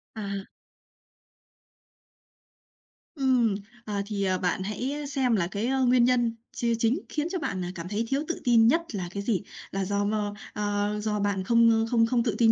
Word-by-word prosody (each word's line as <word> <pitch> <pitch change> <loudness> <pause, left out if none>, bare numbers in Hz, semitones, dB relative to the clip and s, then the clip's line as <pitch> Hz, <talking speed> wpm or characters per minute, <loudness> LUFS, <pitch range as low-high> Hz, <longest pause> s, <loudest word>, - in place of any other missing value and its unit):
À. 200 -2 -5 2.7
Ừm, 255 -7 +2 0.3
ờ, 205 -2 -2
thì, 205 -1 -2
ờ, 185 -1 +1
bạn 180 +1 -1
hãy 215 +8 -3
xem 265 -4 +1
là 175 -5 +1
cái, 205 +5 -2
ơ, 265 0 +2
nguyên 245 0 +5
nhân 240 -2 +2 0.2
chia 235 -1 +1
chính 230 +8 +2
khiến 300 +1 -1
cho 370 - -1
bạn, 190 - -3
ờ, 175 - -3
cảm 170 +1 -6
thấy 215 +3 -1
thiếu 275 +1 +1
tự 345 - -3
tin 230 -3 +5
nhất 330 +8 +4
là 185 -3 -3
cái 200 +1 -4
gì? 210 -3 0 0.3
Là 195 0 -1
do 200 +1 0
mơ, 210 -1 -1 0.2
ơ, 205 0 -1
do 210 -1 0
bạn 200 -2 0
không 230 +1 +4
không 230 -2 +4
không 235 0 +1
tự 225 -4 0
tin 225 -1 +5
225 Hz, 185 wpm, -27 LUFS, 200-245 Hz, 2.7 s, nguyên